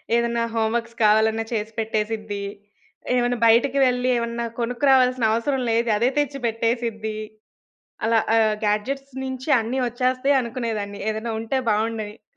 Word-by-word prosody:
ఏదన్నా 235 Hz, 0 st, +1 dB
హోమ్‌వర్క్స్ 230 Hz, +1 st, -1 dB
కావాలన్నా 220 Hz, +1 st, +3 dB
చేసి 220 Hz, 0 st, -2 dB
పెట్టేసిద్ది. 215 Hz, -2 st, -2 dB, 0.7 s
ఏమైనా 245 Hz, 0 st, +1 dB
బయటకి 245 Hz, +4 st, +4 dB
వెళ్ళి 250 Hz, 0 st, +1 dB
ఏమన్నా 235 Hz, 0 st, -2 dB
కొనుక్కురావాల్సిన 250 Hz, 0 st, +3 dB
అవసరం 260 Hz, +4 st, 0 dB
లేదు. 230 Hz, +1 st, +1 dB
అదే 240 Hz, +4 st, +2 dB
తెచ్చి 290 Hz, -1 st, 0 dB
పెట్టేసిద్ది. 230 Hz, -1 st, -1 dB, 0.9 s
అలా 225 Hz, 0 st, +3 dB, 0.2 s
ఆహ్, 215 Hz, -1 st, +3 dB
గాడ్జెట్స్ 270 Hz, +7 st, -1 dB
నుంచి 260 Hz, +2 st, -5 dB
అన్ని 240 Hz, +4 st, -2 dB
ఒచ్చేస్తాయి 255 Hz, +3 st, +1 dB
అనుకునేదాన్ని. 225 Hz, -4 st, -4 dB
ఏదైనా 220 Hz, +2 st, -3 dB
ఉంటే 225 Hz, +4 st, -2 dB
బావుండని. 215 Hz, 0 st, -1 dB
కానీ 210 Hz, -, -50 dB
230 Hz, 125 wpm, -23 LUFS, 220-250 Hz, 0.9 s, బయటకి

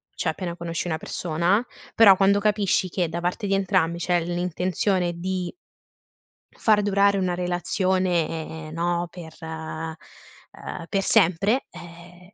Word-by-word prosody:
cioè -, -, -1 dB
appena 175 Hz, -2 st, -4 dB
conosci 170 Hz, 0 st, -4 dB
una 160 Hz, -2 st, -1 dB
persona, 175 Hz, +9 st, 0 dB, 0.3 s
però, 205 Hz, -4 st, +8 dB
quando 200 Hz, +1 st, +4 dB
capisci 205 Hz, -3 st, +1 dB
che, 175 Hz, -1 st, -1 dB
da 170 Hz, +2 st, -4 dB
parte 180 Hz, +3 st, -2 dB
di 195 Hz, -, +1 dB
entrambi, 170 Hz, -3 st, +1 dB
c'è 175 Hz, 0 st, +1 dB
l'intenzione 180 Hz, +1 st, 0 dB
di 180 Hz, +1 st, -3 dB, 1.0 s
far 215 Hz, -2 st, +2 dB
durare 200 Hz, 0 st, +3 dB
una 185 Hz, -2 st, 0 dB
relazione, 175 Hz, -3 st, -1 dB
no, 170 Hz, +1 st, -1 dB
per 165 Hz, -3 st, -10 dB
ehm, 160 Hz, -1 st, -6 dB, 0.9 s
per 195 Hz, -1 st, 0 dB
sempre, 200 Hz, +5 st, +3 dB
eh, 175 Hz, +2 st, -13 dB
180 Hz, 125 wpm, -24 LUFS, 170-195 Hz, 1.0 s, però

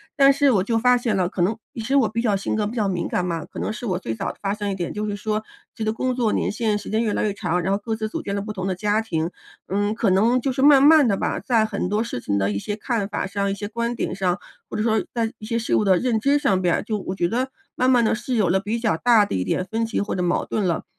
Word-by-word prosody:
但 275 Hz, 0 st, +6 dB
是 280 Hz, 0 st, +3 dB
我 195 Hz, -6 st, +2 dB
就 225 Hz, +3 st, 0 dB
发 250 Hz, +1 st, +4 dB
现 235 Hz, -4 st, -1 dB
了 185 Hz, -2 st, +1 dB
可 185 Hz, -, -3 dB
能 200 Hz, +6 st, +1 dB, 0.2 s
是 240 Hz, +3 st, -1 dB
我 255 Hz, -5 st, +4 dB
比 230 Hz, +2 st, -2 dB
较 215 Hz, -4 st, +2 dB
性 195 Hz, -, -2 dB
格 215 Hz, -1 st, 0 dB
比 220 Hz, -, -4 dB
较 215 Hz, -4 st, +1 dB
敏 180 Hz, -3 st, -1 dB
感 180 Hz, -, -1 dB
嘛， 170 Hz, -2 st, -3 dB
可 -, -, -9 dB
能 -, -, -2 dB
是 230 Hz, -, -6 dB
我 185 Hz, -5 st, -1 dB
最 115 Hz, -, -4 dB
早 -, -, -3 dB
发 200 Hz, 0 st, -1 dB
现 205 Hz, -1 st, -3 dB
一 -, -, -2 dB
点， 175 Hz, -2 st, -4 dB
就 210 Hz, 0 st, -3 dB
是 205 Hz, -1 st, -2 dB
说， 215 Hz, +1 st, -2 dB, 0.3 s
这 225 Hz, -, -4 dB
个 215 Hz, -, +1 dB
工 255 Hz, +2 st, -1 dB
作 230 Hz, -4 st, +1 dB
年 -, -, 0 dB
限 215 Hz, -1 st, 0 dB
时 205 Hz, -, -8 dB
间 220 Hz, +2 st, +1 dB
越 215 Hz, -, 0 dB
来 -, -, 0 dB
越 210 Hz, -2 st, 0 dB
长， 180 Hz, -3 st, -1 dB
然 190 Hz, +3 st, -1 dB
后 200 Hz, -, 0 dB
各 225 Hz, -1 st, -2 dB
自 220 Hz, 0 st, -3 dB
组 -, -, -4 dB
建 200 Hz, -, -3 dB
了 200 Hz, -, -1 dB
不 215 Hz, +1 st, -5 dB
同 185 Hz, -1 st, -4 dB
的 190 Hz, -, 0 dB
家 210 Hz, +4 st, +1 dB
庭， 165 Hz, -6 st, -2 dB, 0.4 s
嗯， 205 Hz, +2 st, 0 dB
可 220 Hz, -2 st, +1 dB
能 225 Hz, +7 st, +3 dB
就 270 Hz, -, 0 dB
是 265 Hz, -, -2 dB
慢 280 Hz, -1 st, +7 dB
慢 295 Hz, -2 st, +7 dB
地 200 Hz, -, +1 dB
吧， -, -, -1 dB
在 230 Hz, -4 st, +2 dB
很 200 Hz, -4 st, -2 dB
多 210 Hz, +2 st, +1 dB
事 230 Hz, -, -4 dB
情 100 Hz, -, -1 dB
的 100 Hz, +1 st, +1 dB
一 100 Hz, -, -2 dB
些 205 Hz, -, -4 dB
看 225 Hz, -3 st, -1 dB
法 205 Hz, -, -2 dB
上， 200 Hz, 0 st, -1 dB
一 -, -, 0 dB
些 205 Hz, +1 st, -5 dB
观 235 Hz, +2 st, -2 dB
点 -, -, -3 dB
上， 185 Hz, -1 st, 0 dB, 0.3 s
或 -, -, -6 dB
者 -, -, 0 dB
说 220 Hz, -1 st, +2 dB
在 230 Hz, -2 st, -1 dB
一 215 Hz, -, -8 dB
些 230 Hz, +1 st, -1 dB
事 225 Hz, -, 0 dB
物 -, -, +3 dB
的 190 Hz, -2 st, +4 dB
认 240 Hz, -1 st, +1 dB
知 280 Hz, +5 st, +2 dB
上 195 Hz, -10 st, +1 dB
边 175 Hz, -2 st, +2 dB
儿， -, -, -2 dB
就 215 Hz, 0 st, -2 dB
我 185 Hz, -, -4 dB
觉 175 Hz, -2 st, +1 dB
得 255 Hz, +6 st, -1 dB, 0.3 s
慢 255 Hz, +1 st, +2 dB
慢 245 Hz, -2 st, +4 dB
地 220 Hz, -, +2 dB
是 245 Hz, +2 st, -3 dB
有 205 Hz, -6 st, +2 dB
了 190 Hz, +2 st, +3 dB
比 215 Hz, +4 st, -2 dB
较 220 Hz, -8 st, +1 dB
大 230 Hz, +1 st, +5 dB
的 -, -, -3 dB
一 90 Hz, -, 0 dB
点 185 Hz, -, -1 dB
分 225 Hz, +2 st, 0 dB
歧 225 Hz, -, -2 dB
或 205 Hz, -, -2 dB
者 180 Hz, -, -1 dB
矛 175 Hz, -1 st, 0 dB
盾 210 Hz, -3 st, -1 dB
了。 170 Hz, -2 st, -1 dB
215 Hz, 340 characters per minute, -23 LUFS, 195-235 Hz, 0.4 s, 慢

